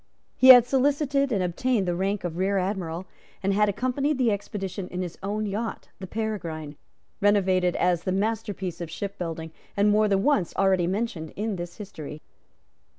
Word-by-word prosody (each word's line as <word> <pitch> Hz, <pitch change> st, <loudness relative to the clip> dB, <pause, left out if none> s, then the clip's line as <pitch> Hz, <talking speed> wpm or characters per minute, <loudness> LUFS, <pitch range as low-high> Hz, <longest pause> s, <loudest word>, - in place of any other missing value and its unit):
He 260 Hz, -, +4 dB
had 245 Hz, -2 st, +11 dB
solicited 275 Hz, +1 st, +1 dB
and 200 Hz, -5 st, +1 dB
obtained 200 Hz, +3 st, 0 dB
the 175 Hz, -, +1 dB
rank 195 Hz, +3 st, -1 dB
of 175 Hz, -2 st, -3 dB
Rear 195 Hz, +1 st, +1 dB
Admiral, 185 Hz, -2 st, -2 dB, 0.4 s
and 195 Hz, +1 st, +2 dB
had 210 Hz, +1 st, +3 dB
accompanied 255 Hz, +7 st, 0 dB
the 245 Hz, -4 st, +3 dB
expedition 195 Hz, -2 st, -4 dB
in 180 Hz, 0 st, -4 dB
his 175 Hz, -2 st, -6 dB
own 210 Hz, +2 st, -2 dB
yacht, 210 Hz, +3 st, -4 dB
the 190 Hz, -, -7 dB
Peregrine, 170 Hz, -9 st, -4 dB, 0.4 s
renowned 190 Hz, -3 st, +3 dB
as 175 Hz, -1 st, +2 dB
the 185 Hz, -, -2 dB
masterpiece 200 Hz, -3 st, -2 dB
of 170 Hz, -, -5 dB
shipbuilding, 165 Hz, -3 st, -5 dB, 0.3 s
and 205 Hz, +1 st, +4 dB
more 215 Hz, +1 st, +4 dB
than 195 Hz, -1 st, +2 dB
once 280 Hz, -, +1 dB
already 190 Hz, -3 st, +3 dB
mentioned 185 Hz, -5 st, -3 dB
in 210 Hz, 0 st, -2 dB
this 175 Hz, -1 st, -7 dB
history. 160 Hz, -7 st, -8 dB
195 Hz, 165 wpm, -26 LUFS, 180-220 Hz, 0.4 s, had